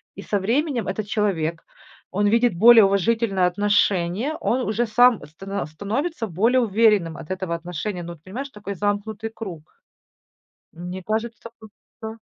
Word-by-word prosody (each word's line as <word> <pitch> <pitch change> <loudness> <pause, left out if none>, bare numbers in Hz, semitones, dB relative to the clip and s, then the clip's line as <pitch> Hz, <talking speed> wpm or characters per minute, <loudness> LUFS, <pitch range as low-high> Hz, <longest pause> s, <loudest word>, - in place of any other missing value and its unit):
И - - -9
со 205 - -1
временем 245 - 0
этот 210 +2 -3
человек, 170 -7 -1 0.5
он 205 +2 +1
видит 230 +2 +3
более 225 +5 +8
уважительное 195 0 +2
отношение, 205 - +1
он 250 - +1
уже 225 +3 0
сам 240 +1 +4
стана 195 +6 -5
становится 225 - -3
более 220 +8 +2
уверенным 210 -7 +2
от 160 +2 -9
этого 185 -2 -2
отношения. 175 +2 -5
Ну, 170 0 -7
вот 160 -2 -19
понимаешь, 250 +10 -6
такой 205 -4 -7
замкнутый 205 +3 -2
круг. 175 -10 -9 1.0
Мне 180 +2 -7
кажется, 225 +3 -3
тут 220 -1 -14 0.3
всё 220 +1 -6
205 Hz, 145 wpm, -23 LUFS, 180-230 Hz, 1.0 s, более